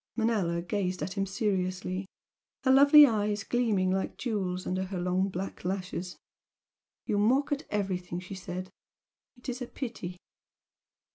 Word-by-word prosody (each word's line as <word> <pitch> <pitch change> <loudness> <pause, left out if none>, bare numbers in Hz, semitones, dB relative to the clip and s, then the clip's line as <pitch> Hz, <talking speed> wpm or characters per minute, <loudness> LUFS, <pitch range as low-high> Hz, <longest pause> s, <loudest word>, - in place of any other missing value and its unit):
Manella 205 -7 +1
gazed 185 0 -2
at 185 - -3
him 195 0 -1
seriously 185 -2 -1 0.6
her 260 - +4
lovely 285 +2 +9
eyes 210 -4 0
gleaming 210 -7 +1
like 190 0 -1
jewels 190 -6 -2
under 185 +1 -1
her 190 -1 -4
long 180 +2 +1
black 190 +1 -5
lashes. 180 -1 -3 0.9
"You 205 - 0
mock 260 +8 +3
at 290 +1 -2
everything," 185 -4 -2
she 185 +2 -8
said 185 0 -6 0.7
"It 245 - -13
is 250 0 -3
a 245 - -3
pity!" 225 -10 -6
195 Hz, 140 wpm, -29 LUFS, 185-225 Hz, 0.9 s, lovely